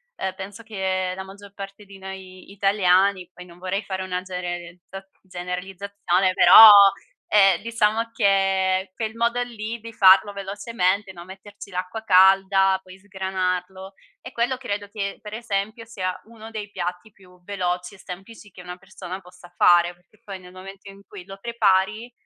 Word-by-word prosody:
ehm, 190 - -4
penso 195 +3 -9
che 190 -4 -2
la 190 - -6
maggior 200 +1 -14
parte 200 +1 -10
di 195 -1 -14
noi 190 -1 -11
italiani, 195 -2 +2
poi 180 0 -13
non 175 0 -17
vorrei 185 +3 -3
fare 190 -1 -5
una 180 -1 -3
gererizza 180 +1 -7
generalizzazione, 185 +1 -2
però, 185 +5 +10 0.6
ehm, 195 -4 +4
diciamo 230 0 0
che 195 -3 +1
quel 220 -1 -4
modo 235 +1 0
lì 230 -1 -7
di 230 +1 -9
farlo 195 0 +5
velocemente, 200 -1 -2
no, 170 -1 -11
metterci 195 +2 -12
l'acqua 185 +5 -5
calda, 190 0 +4
poi 185 0 -15
sgranarlo, 190 -1 -4 0.3
e 250 - -10
quello 240 +2 -1
credo 205 -5 -5
che 200 -1 -5
per 210 -1 -10
esempio 220 0 -4
sia 185 -5 -4
uno 225 0 -13
dei 210 -2 -7
piatti 180 +3 -5
più 180 -2 -22
veloci 180 -1 -3
e - - -17
semplici 195 +4 -11
che 180 - -13
una 180 0 -9
persona 185 0 -9
possa 180 -1 -17
fare. 175 0 +3
Che 215 - -29
poi 195 -2 -8
nel 180 0 -15
momento 195 +2 -12
in 195 0 -14
cui 190 -4 -11
lo 195 0 -11
prepari, 215 0 0
195 Hz, 160 wpm, -23 LUFS, 185-205 Hz, 0.6 s, però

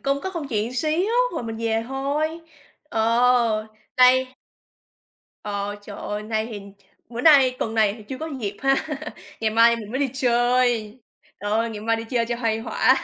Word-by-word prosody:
công 275 0 0
có 380 - -4
công 325 -6 -5
chuyện 220 0 -1
xíu 320 - +1 0.2
rồi 320 - -3
mình 225 -1 -5
về 225 0 -1
thôi, 295 +5 -2 0.5
ờ, 230 -1 +2 0.3
đây 255 0 +5 1.1
Ờ, 205 0 -3
trời 205 -1 -9
ơi, 210 0 -4
nay 220 0 -2
thì 215 -3 -7 0.2
ch - - -29 0.3
bữa 235 +1 -4
nay 270 -5 +6
tuần 225 0 -2
này 215 -2 +3
thì 220 - -12
chưa 260 - -5
có 320 - -4
dịp 205 -1 -4
ha, 270 0 +4 0.7
ngày 220 - +1
mai 230 +1 +5
mình 215 -2 -8
mới 260 - -2
đi 275 -3 +1
chơi, 240 -3 +1 0.4
trời 205 - -3
ơi, 225 +2 +1
ngày 210 - -7
mai 225 +1 +1
đi 225 - -5
chơi 235 -2 +1
cho 240 0 -2
khuây 225 -1 0
khỏa. 255 +2 +3
235 Hz, 190 wpm, -23 LUFS, 220-260 Hz, 1.1 s, nay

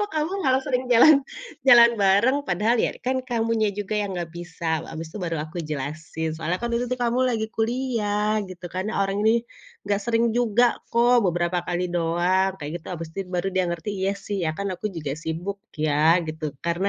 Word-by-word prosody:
"Kok 415 - -2
kamu 310 +3 -1
malah 260 0 +3
sering 255 -1 0
jalan, 275 +4 +7 0.5
jalan 235 -2 +9
bareng." 210 +8 +3
"Padahal 210 +7 +2
ya - - +1
kan 260 0 0
kamunya 230 -3 0
juga 205 +1 -4
yang 200 -2 -3
enggak 170 -1 -4
bisa." 165 -2 -3
Abis 160 0 -6
itu - - -5
baru 165 -1 -2
aku 165 +3 -8
jelasin, 155 +2 -4
"Soalnya 165 +3 -2
kan 235 - -1
itu 245 +1 0
tuh 255 - -2
kamu 240 +2 +1
lagi 220 -2 -1
kuliah." 215 -3 0
Gitu 180 -1 -9
kan. 185 +1 -2
"Orang 195 +1 0
ini 230 +1 +3 0.4
enggak 200 0 +1
sering 235 0 +2
juga 240 0 +3 0.3
kok, 240 -1 +4
beberapa 175 0 0
kali 180 0 -1
doang." 175 +3 +1
Kayak 150 -1 -6
gitu. - - -19
Abis 165 -1 -6
itu 195 -2 -4
baru 180 +2 0
dia 185 - +2
ngerti, 170 +4 -4
"Iya 195 +1 +1
sih, 205 +1 -5
ya 160 - +1
kan 200 0 -2
aku 180 - -4
juga 150 -4 -3
sibuk 165 +5 -4 0.2
ya." 155 +3 +4
Gitu. 155 -2 -4
Karena 170 +4 0
195 Hz, 195 wpm, -24 LUFS, 170-235 Hz, 0.5 s, jalan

